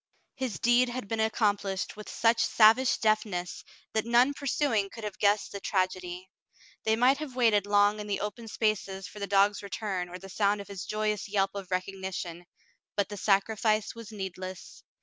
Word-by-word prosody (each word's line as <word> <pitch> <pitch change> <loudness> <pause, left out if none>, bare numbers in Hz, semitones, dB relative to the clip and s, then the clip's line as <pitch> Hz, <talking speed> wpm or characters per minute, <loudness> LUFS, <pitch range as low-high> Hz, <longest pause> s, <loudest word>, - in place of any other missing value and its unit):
His 260 -6 -3
deed 240 +1 +3
had 240 -3 -5
been 225 +2 -2
accomplished 205 -3 0
with 210 0 -9
such 230 0 +2
savage 225 +4 +5
deftness 210 -5 0 0.3
that 220 - +1
none 240 +4 +4
pursuing 275 -7 0
could 225 - -10
have 210 -2 -5
guessed 205 0 +2
the 200 - -5
trag 185 -1 +1
edy. 180 0 -8 0.6
They 220 0 +3
might 255 +4 +4
have 295 -5 -6
waited 215 -5 +3
long 205 +1 +3
in 210 - -6
the 205 - -2
open 210 +3 -5
spaces 200 -3 -1
for 210 - -11
the 200 - -3
dog's 200 +1 +3
return 200 -3 -3
or 180 - -7
the 195 - -11
sound 205 +1 +1
of 200 - -9
his 195 -2 -6
joyous 215 -1 -1
yelp 195 -1 +1
of 200 -2 -6
recog 185 +1 -2
nition, 175 -2 -5 0.5
but 200 -1 0
the 205 - -6
sacrifice 215 +2 +1
was 230 -1 -10
needless. 185 -2 -7
205 Hz, 185 wpm, -29 LUFS, 195-225 Hz, 0.6 s, savage